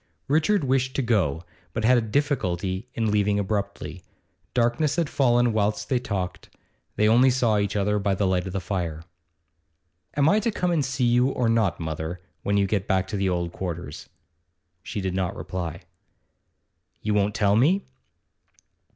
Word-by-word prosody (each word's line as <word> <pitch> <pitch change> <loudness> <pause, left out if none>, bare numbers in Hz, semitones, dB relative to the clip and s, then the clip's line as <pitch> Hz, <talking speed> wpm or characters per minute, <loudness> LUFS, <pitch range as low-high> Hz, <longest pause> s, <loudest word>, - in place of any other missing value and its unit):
Richard 160 +6 +2
wished 130 -1 +1
to 135 - +1
go, 90 - +1 0.3
but 110 -1 -1
had 125 +2 +6
a - - 0
difficulty 105 - -1
in 110 -2 0
leaving 105 -1 +2
abruptly. 100 0 -3 0.5
Darkness 125 +5 +2
had 170 -4 -1
fallen 120 -3 +3
whilst 105 -1 0
they 130 - +2
talked; 95 -6 -4 0.5
they 105 - +3
only 120 +4 +6
saw 120 -4 +2
each 100 0 -1
other 105 +1 +1
by 100 -1 +1
the 100 - 0
light 95 -1 +1
of 95 - -6
the 100 - -1
fire. 85 -5 -3 1.1
'Am 145 0 +4
I 205 +6 +5
to 225 - 0
come 180 -4 -1
and 160 -4 +2
see 130 0 -1
you 120 +1 +4
or 125 -3 0
not, 115 -5 +2
mother, 80 +2 -4 0.2
when 100 0 0
you 100 - +3
get 100 -1 -1
back 95 -1 +1
to - - -3
the 95 -1 +1
old 85 -1 -1
quarters?' 90 -2 -6 0.7
She 105 +2 -5
did 95 -1 -2
not 95 -1 -1
reply. 85 -3 -5 1.2
'You 105 - 0
won't 105 0 +1
tell 100 -1 +3
me? 165 - +3
105 Hz, 170 wpm, -25 LUFS, 95-125 Hz, 1.2 s, had